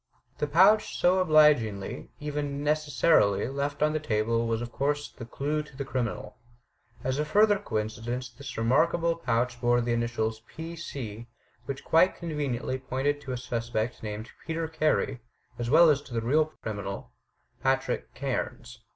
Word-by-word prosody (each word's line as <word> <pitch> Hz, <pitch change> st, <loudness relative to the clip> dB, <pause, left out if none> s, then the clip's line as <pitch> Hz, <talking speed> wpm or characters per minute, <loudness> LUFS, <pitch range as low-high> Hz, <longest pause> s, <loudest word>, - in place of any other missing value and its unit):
The 150 Hz, -, 0 dB
pouch, 190 Hz, +8 st, +4 dB
so 180 Hz, +1 st, +4 dB
obligingly, 150 Hz, -, +3 dB
even 145 Hz, -1 st, -3 dB
necessarily, 145 Hz, -8 st, +3 dB
left 140 Hz, +2 st, -2 dB
on 155 Hz, 0 st, +2 dB
the 155 Hz, -, 0 dB
table 115 Hz, -3 st, 0 dB
was 115 Hz, -1 st, 0 dB
of 120 Hz, 0 st, -5 dB
course 145 Hz, +3 st, -1 dB
the 115 Hz, -, -10 dB
clue 150 Hz, +5 st, -1 dB
to 150 Hz, -3 st, -14 dB
the 140 Hz, -, -3 dB
criminal. 115 Hz, -5 st, -3 dB, 0.7 s
As 130 Hz, +2 st, -1 dB
a -, -, +2 dB
further 205 Hz, +6 st, +4 dB
coincidence 115 Hz, -, -3 dB
this 130 Hz, +3 st, -9 dB
remarkable 165 Hz, +8 st, +2 dB
pouch 120 Hz, -5 st, -1 dB
bore 120 Hz, 0 st, +3 dB
the 120 Hz, 0 st, 0 dB
initials 115 Hz, -1 st, -1 dB
"P. 165 Hz, +1 st, -7 dB
C," 120 Hz, -9 st, -6 dB, 0.4 s
which 140 Hz, -1 st, -5 dB
quite 175 Hz, +3 st, +4 dB
conveniently 140 Hz, -6 st, -3 dB
pointed 135 Hz, +3 st, -1 dB
to 135 Hz, -, -6 dB
a 125 Hz, -, -2 dB
suspect 120 Hz, -1 st, -3 dB
named 110 Hz, +1 st, -6 dB, 0.2 s
Peter 165 Hz, 0 st, -2 dB
Carey, 155 Hz, -5 st, 0 dB, 0.4 s
as 120 Hz, 0 st, -2 dB
well 165 Hz, +5 st, +7 dB
as 140 Hz, -1 st, +1 dB
to 135 Hz, -4 st, -9 dB
the 115 Hz, -, +1 dB
real 150 Hz, +7 st, +3 dB
criminal, 100 Hz, -9 st, -6 dB, 0.5 s
Patrick 135 Hz, 0 st, 0 dB
Cairns. 120 Hz, -3 st, -4 dB
135 Hz, 155 wpm, -28 LUFS, 115-150 Hz, 0.7 s, well